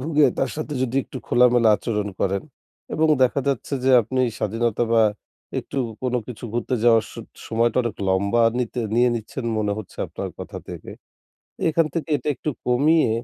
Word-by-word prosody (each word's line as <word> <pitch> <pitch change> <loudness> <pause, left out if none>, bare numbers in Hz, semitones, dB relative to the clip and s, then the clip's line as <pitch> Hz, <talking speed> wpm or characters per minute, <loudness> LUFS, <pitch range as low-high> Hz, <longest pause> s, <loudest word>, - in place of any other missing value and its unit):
ভুগে 150 +1 +3
তার - - +1
সাথে 155 -1 -4
যদি 130 0 -1
একটু 130 - -8
খোলামেলা 120 -2 +4
আচরণ 105 -3 -2
করেন। 100 0 0 0.5
এবং 160 0 +2
দেখা 130 +2 +3
যাচ্ছে 140 +1 -1
যে 135 - +4
আপনি 130 +4 -2 0.2
স্বাধীনতা 115 +2 0
বা 115 -1 +5 0.6
একটু - - -5 0.2
কোন 125 -1 -1
কিছু 120 -1 -8
ঘুরতে 120 +2 -1
যাওয়ার 115 -2 +5
স - - -13 0.3
সময়টা 115 +1 +1
অনেক 120 -2 -3
লম্বা 100 +5 +2 0.2
নিতে, 125 0 -2
নিয়ে 120 +1 +4
নিচ্ছেন 115 +3 -5
মনে 105 -1 0
হচ্ছে 110 - -9
আপনার - - -5
কথা - - -7
থেকে। - - -8 0.8
এখান 160 0 +2
থেকে 165 -1 -3
এটা 140 +2 -5
একটু 150 - -3 0.2
কমিয়ে 140 +3 +3
120 Hz, 170 wpm, -23 LUFS, 115-135 Hz, 0.8 s, বা